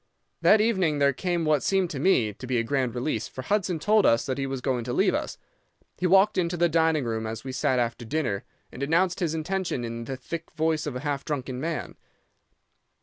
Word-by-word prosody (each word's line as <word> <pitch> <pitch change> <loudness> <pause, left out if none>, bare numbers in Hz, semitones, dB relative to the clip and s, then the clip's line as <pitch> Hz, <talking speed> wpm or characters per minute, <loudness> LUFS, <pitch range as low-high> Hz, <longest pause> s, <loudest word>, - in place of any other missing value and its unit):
"'That 215 - +6
evening 190 -9 +2
there 140 -1 +3
came 175 +3 -1
what 150 -3 +3
seemed 190 -2 +1
to 145 -5 -5
me 125 - +3
to 125 +5 -9
be 125 -1 0
a 115 - +1
grand 125 -1 -1
release, 120 -3 -2
for 130 - -8
Hudson 195 0 0
told 210 +6 +3
us 115 -7 +3
that 130 0 -2
he 135 - -1
was 135 -1 -3
going 125 -2 -1
to 120 - -3
leave - - +3
us. - - -3 0.6
He 180 - +1
walked 195 +2 +4
into 175 0 -1
the 175 +1 +4
dining 160 -2 +2
room 110 -2 -2
as 110 0 -5
we 135 - -5
sat 130 0 +1
after 120 0 -1
dinner, 120 -6 -2 0.3
and 125 - -9
announced 170 +5 +1
his 165 -4 -1
intention 170 -5 -2
in 115 0 -5
the 135 +2 -5
thick 165 +6 -6
voice 155 -1 0
of 140 - -4
a 125 - -4
half 145 -2 -2
drunken 130 -4 -4
man. 160 +2 -4
145 Hz, 220 wpm, -26 LUFS, 125-170 Hz, 0.6 s, That